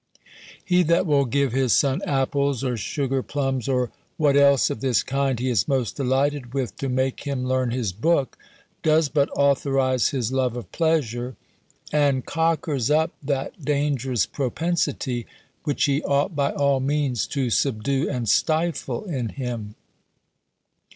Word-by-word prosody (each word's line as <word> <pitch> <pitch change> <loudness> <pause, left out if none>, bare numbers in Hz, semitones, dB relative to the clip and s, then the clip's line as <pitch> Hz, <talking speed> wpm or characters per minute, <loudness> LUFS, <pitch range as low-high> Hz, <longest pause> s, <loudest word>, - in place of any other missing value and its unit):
He 180 -1 +3
that 170 +2 +2
will 145 -4 +3
give 140 +1 +1
his 130 -3 +2
son 135 -2 +2
apples, 140 -1 0
or 125 -2 0
sugar 135 - -2
plums, 135 -3 -2
or 125 -2 0 0.3
what 145 -3 +3
else 140 -2 +5
of 110 - -5
this 130 -4 +2
kind 135 -2 -1
he 130 - -1
is 110 -7 +1
most 130 -5 0
delighted 135 -1 0
with, 130 -3 -2
to 135 - -3
make 130 +1 0
him 140 -3 -3
learn 130 -1 +1
his 120 -5 -2
book, 135 - +1 0.5
does 155 -1 +3
but 140 -1 +1
authorize 135 -2 +2
his 125 -4 -2
love 130 -2 0
of 120 - -8
pleasure, 130 -7 0 0.6
and 140 -3 +2
cockers 160 -6 0
up 160 +2 +2
that 140 +2 -3
dangerous 135 -5 0
propensity, 135 -3 -2 0.4
which 145 - 0
he 140 +1 +2
ought, 145 +5 0
by 140 -1 +1
all 140 -2 +1
means, 135 -3 0
to 130 -4 -1
subdue 135 +4 0
and 125 -4 -3
stifle 160 - 0
in 130 - -3
him. 115 -5 -5
135 Hz, 150 wpm, -24 LUFS, 125-145 Hz, 0.6 s, else